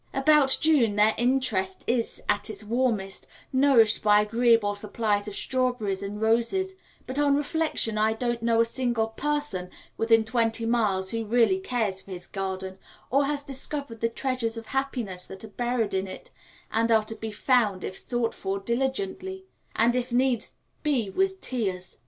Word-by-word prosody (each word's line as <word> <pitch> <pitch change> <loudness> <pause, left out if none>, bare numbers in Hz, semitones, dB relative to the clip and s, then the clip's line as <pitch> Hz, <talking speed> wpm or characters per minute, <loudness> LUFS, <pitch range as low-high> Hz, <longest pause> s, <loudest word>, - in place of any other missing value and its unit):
About 275 0 +4
June 270 -10 +3
their 210 +1 +4
interest 240 -7 +1
is 235 -1 -1
at 205 - 0
its 215 -1 -5
warmest, 220 -4 -1 0.3
nourished 260 -5 +4
by 210 -1 +5
agreeable 225 -1 +3
supplies 205 0 -1
of 205 - -5
strawberries 250 -7 0
and 200 +1 -5
roses; 235 - +1 0.3
but 260 +2 -3
on 285 -1 +4
reflection 290 -7 0
I 220 +1 +3
don't 240 +1 -2
know 230 0 +2
a - - +3
single 235 -2 -1
person 290 -8 -2 0.3
within 225 0 +3
twenty 230 0 0
miles 210 -5 +1
who 230 0 -2
really 240 - +3
cares 225 - -2
for - - -18
his 180 -2 -6
garden, 190 -1 -5 0.3
or 275 +2 +3
has 285 0 -2
discovered 275 -3 -3
the 230 - +1
treasures 235 -2 -2
of 225 - -7
happiness 240 -9 -3
that 190 - -10
are - - -7
buried 240 -1 -1
in 190 0 -1
it, 185 - -10 0.4
and 230 +1 +1
are 220 -1 +5
to 225 - -6
be 220 0 -6
found 210 -4 +1
if 190 - -5
sought 240 +1 -1
for 195 +1 -3
diligently, 265 - -2 0.3
and 235 +2 +3
if 250 0 -2
needs 250 -1 +1 0.3
be 255 -10 0
with 385 - 0
tears. 190 -8 -3
230 Hz, 165 wpm, -26 LUFS, 210-260 Hz, 0.4 s, by